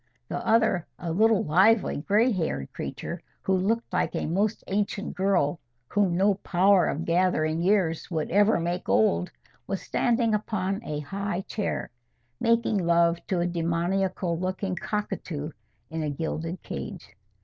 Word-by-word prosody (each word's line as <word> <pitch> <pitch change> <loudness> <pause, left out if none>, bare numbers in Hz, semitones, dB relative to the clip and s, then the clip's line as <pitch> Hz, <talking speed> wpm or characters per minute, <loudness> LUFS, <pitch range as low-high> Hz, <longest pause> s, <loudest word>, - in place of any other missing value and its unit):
The - - -2
other, 220 -6 +2
a 170 -2 -4
little 220 +4 +3
lively 195 +8 +4
gray 210 - +2
haired 160 - -2
creature, - - -5 0.2
who 190 - +2
looked 210 +4 0
like 180 - 0
a - - -1
most 200 +6 0
ancient 200 0 -2
girl 185 -5 +1 0.3
whom 195 -4 +2
no 200 +2 +4
power 185 -1 +4
of 160 +4 -2
gathering 165 -2 +1
years 180 -4 +1
would 160 -4 -2
ever 205 +1 +4
make 175 +2 -3
old, 90 -5 +3 0.4
was 195 - -2
standing 235 -2 +1
upon 200 -1 -1
a 150 -7 -4
high 195 +4 -3
chair, 205 +2 -3 0.5
making 230 -2 +2
love 170 -1 +3
to 180 -3 0
a - - +1
demoniacal 175 +1 -1
looking 185 +1 -2
cockatoo 170 -6 -4 0.4
in 160 0 -3
a 150 - -1
gilded 165 +3 -4
cage. 70 0 -7
185 Hz, 145 wpm, -26 LUFS, 165-205 Hz, 0.5 s, lively